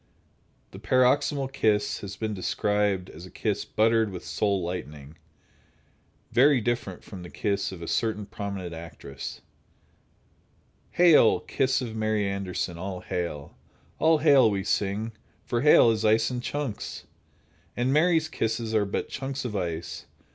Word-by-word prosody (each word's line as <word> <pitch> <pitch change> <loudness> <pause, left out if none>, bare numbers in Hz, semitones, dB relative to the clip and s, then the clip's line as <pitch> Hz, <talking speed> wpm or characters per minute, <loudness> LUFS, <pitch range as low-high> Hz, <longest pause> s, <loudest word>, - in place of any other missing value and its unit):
The - - -10
"paroxysmal 135 +2 +2
kiss" 105 -6 +1
has 100 -1 -7
been 110 +2 -3
described 100 0 0
as 85 +4 -11
a - - -14
kiss 105 0 -2
"buttered 110 0 +2
with 90 -2 -8
soul 100 -3 0
lightning." 75 -4 -6 1.2
Very 135 +2 +5
different 120 -5 -3
from 95 -3 -10
the 90 - -9
kiss 100 -1 -1
of 90 -3 -8
a - - -6
certain 110 -2 -1
prominent 100 -4 -5
actress: 80 -4 -8 1.5
Hail! 175 -3 +6
kiss 135 -1 0
of 115 -3 -5
Mary 110 -2 0
Anderson, 95 -3 -3
all 95 0 -5
hail! 85 -6 -4 0.4
All 160 0 +4
hail, 140 -6 +5
we 100 -2 -2
sing, 105 +2 -1 0.3
for 120 -1 -1
hail 130 -5 +7
is 110 0 -1
ice 110 +2 +3
in 125 -1 -3
chunks, 140 -4 -4 0.7
And 125 +2 +1
Mary's 160 +1 +3
kisses 115 -5 -2
are 105 -2 +3
but 100 - -3
chunks 135 0 -5
of 110 -4 -4
ice. 85 -3 -4
105 Hz, 140 wpm, -26 LUFS, 95-125 Hz, 1.5 s, hail